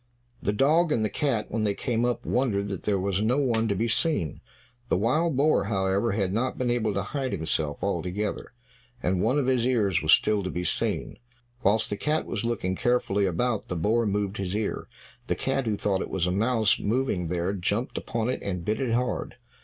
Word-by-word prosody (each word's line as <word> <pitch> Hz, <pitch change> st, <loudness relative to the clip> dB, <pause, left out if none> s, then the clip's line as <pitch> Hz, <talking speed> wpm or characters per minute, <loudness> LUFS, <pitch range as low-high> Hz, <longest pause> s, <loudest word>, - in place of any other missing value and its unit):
The 100 Hz, -, 0 dB
dog 155 Hz, +9 st, +3 dB
and 110 Hz, -7 st, +2 dB
the 105 Hz, -, -2 dB
cat, 135 Hz, -8 st, -1 dB
when 110 Hz, 0 st, -1 dB
they 100 Hz, -2 st, +1 dB
came 120 Hz, 0 st, 0 dB
up, 120 Hz, -1 st, -1 dB
wondered 105 Hz, -6 st, 0 dB
that 95 Hz, -, -5 dB
there 100 Hz, -2 st, +2 dB
was 95 Hz, +1 st, 0 dB
no 115 Hz, +5 st, +2 dB
one 115 Hz, -5 st, +2 dB
to 100 Hz, -, 0 dB
be 115 Hz, +5 st, 0 dB
seen. 115 Hz, -, 0 dB, 0.5 s
The -, -, +3 dB
wild 135 Hz, -, +1 dB
boar, 150 Hz, -5 st, +3 dB
however, 100 Hz, +1 st, +1 dB
had 100 Hz, -3 st, 0 dB
not 125 Hz, +4 st, -1 dB
been 125 Hz, -1 st, 0 dB
able 110 Hz, -4 st, 0 dB
to 100 Hz, -, 0 dB
hide 135 Hz, +4 st, -3 dB
himself 80 Hz, -2 st, -2 dB
altogether; 100 Hz, +3 st, -2 dB, 0.5 s
and 90 Hz, 0 st, +1 dB
one 120 Hz, +7 st, +2 dB
of 145 Hz, -, +1 dB
his 130 Hz, -2 st, +2 dB
ears 100 Hz, -9 st, +2 dB
was 80 Hz, -, +2 dB
still 105 Hz, +3 st, +4 dB
to 95 Hz, -, -3 dB
be 90 Hz, -, -3 dB
seen. -, -, -1 dB, 0.4 s
Whilst 110 Hz, 0 st, +3 dB
the 105 Hz, -, -1 dB
cat 155 Hz, +6 st, 0 dB
was 105 Hz, -, -3 dB
looking 110 Hz, -6 st, -1 dB
carefully 100 Hz, -4 st, +1 dB
about, 110 Hz, +6 st, -1 dB
the 90 Hz, -, -3 dB
boar 110 Hz, +7 st, +1 dB
moved 100 Hz, 0 st, -1 dB
his 95 Hz, 0 st, -3 dB
ear; 105 Hz, 0 st, -2 dB, 0.4 s
the -, -, +1 dB
cat, 135 Hz, -2 st, -1 dB
who 105 Hz, -2 st, 0 dB
thought 100 Hz, -2 st, 0 dB
it -, -, -4 dB
was 95 Hz, -2 st, 0 dB
a 90 Hz, -, 0 dB
mouse 110 Hz, +2 st, +2 dB
moving 105 Hz, -6 st, 0 dB
there, 90 Hz, +3 st, -1 dB
jumped 100 Hz, +5 st, -2 dB
upon 115 Hz, -1 st, -2 dB
it 130 Hz, -, -2 dB
and 90 Hz, -4 st, -4 dB
bit 110 Hz, +3 st, -1 dB
it 125 Hz, -4 st, 0 dB
hard. 125 Hz, -1 st, -1 dB
105 Hz, 210 wpm, -26 LUFS, 95-125 Hz, 0.5 s, still